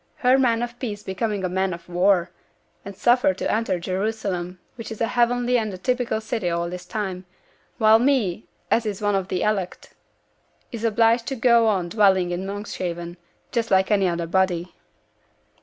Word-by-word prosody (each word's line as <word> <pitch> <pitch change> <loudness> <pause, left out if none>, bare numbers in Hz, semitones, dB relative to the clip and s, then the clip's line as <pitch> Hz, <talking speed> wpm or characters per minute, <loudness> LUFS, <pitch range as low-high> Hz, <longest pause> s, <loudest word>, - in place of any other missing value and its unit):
Her 255 +1 +3
man 235 -3 +2
of 240 0 -6
peace 210 -5 -5
becoming 200 +1 -2
a - - +1
man 190 0 -1
of 170 - -15
war; 180 0 +2 0.5
and 200 0 -9
suffered 240 -3 +3
to - - -1
enter 220 -5 0
Jerusalem, 185 -1 -3 0.2
which 230 -2 -8
is 220 - -7
a 230 - +2
heavenly 245 0 +2
and 215 -2 -3
a 185 - -7
typical 245 +2 -1
city 220 -4 -2
at 170 0 -2
this 180 0 -8
time; 190 -4 -4 0.5
while 220 0 +6
me, 230 -8 +1 0.2
as 230 -1 +2
is 205 -2 -3
one 205 -1 0
of 190 -1 0
the 185 -2 -2
elect, 200 -4 -2 0.8
is 230 -2 -6
obliged 230 +1 +2
to 270 - -2
go 235 -2 +4
on 185 -5 0
dwelling 190 -3 +3
in 180 +2 -3
Monkshaven, 180 -4 -5 0.3
just 230 -2 -1
like 190 +1 +3
any 195 -2 +3
other 170 -1 -1
body.' 180 0 0
205 Hz, 175 wpm, -23 LUFS, 185-230 Hz, 0.8 s, while